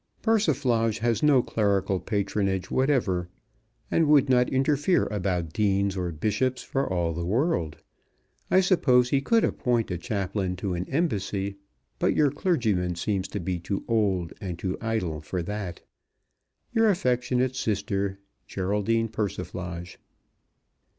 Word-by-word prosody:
Persiflage 135 - +2
has 115 -2 0
no 140 -5 +5
clerical 100 -3 +1
patronage 100 -3 -1
whatever, 115 -11 +1 0.6
and 165 -2 +3
would 145 -3 +5
not 125 -1 +4
interfere 145 +6 +2
about 90 -5 -2
Deans 100 -2 +1
or 90 -2 -2
Bishops 110 - -1
for 135 -5 -2
all 85 -2 0
the 85 +2 -4
world. 105 - 0 0.7
I 190 - +5
suppose 130 -10 +3
he 140 - +3
could 225 +10 +3
appoint 120 -5 0
a 90 - -2
Chaplain 95 0 -2
to 95 +1 -3
an 90 +1 -4
Embassy, 100 - -1 0.4
but - - +2
your 145 -3 +3
clergyman 110 - 0
seems 95 +2 -1
to 100 - -4
be 90 0 -2
too 95 +3 -4
old 100 -7 +1
and 90 -4 -4
too 95 +1 -2
idle 110 -9 -2
for 85 +3 -3
that. 95 -2 -5 0.9
Your 225 -2 +4
affectionate 125 -6 +1
sister, 100 -4 -1 0.3
GERALDINE 105 +4 0
PERSIFLAGE. 90 -4 -5
105 Hz, 130 wpm, -26 LUFS, 95-130 Hz, 0.9 s, no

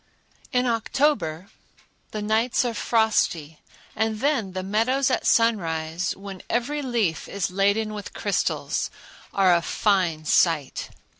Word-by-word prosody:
In 250 0 +2
October 225 - 0 0.6
the 215 -1 -5
nights 225 +4 +1
are 240 - -1
frosty, 205 -10 +1 0.4
and 220 0 0
then 235 -8 0
the 185 0 -3
meadows 255 +7 +1
at - - 0
sunrise, 170 -6 +1
when 195 -1 -9
every 285 +6 -1
leaf 230 - -1
is 200 -2 -2
laden 200 +3 +1
with 210 -1 -8
crystals, - - -1 0.4
are 190 -2 +4
a 170 - +3
fine 175 -5 +1
sight. 155 -4 +2
210 Hz, 125 wpm, -24 LUFS, 180-230 Hz, 0.6 s, are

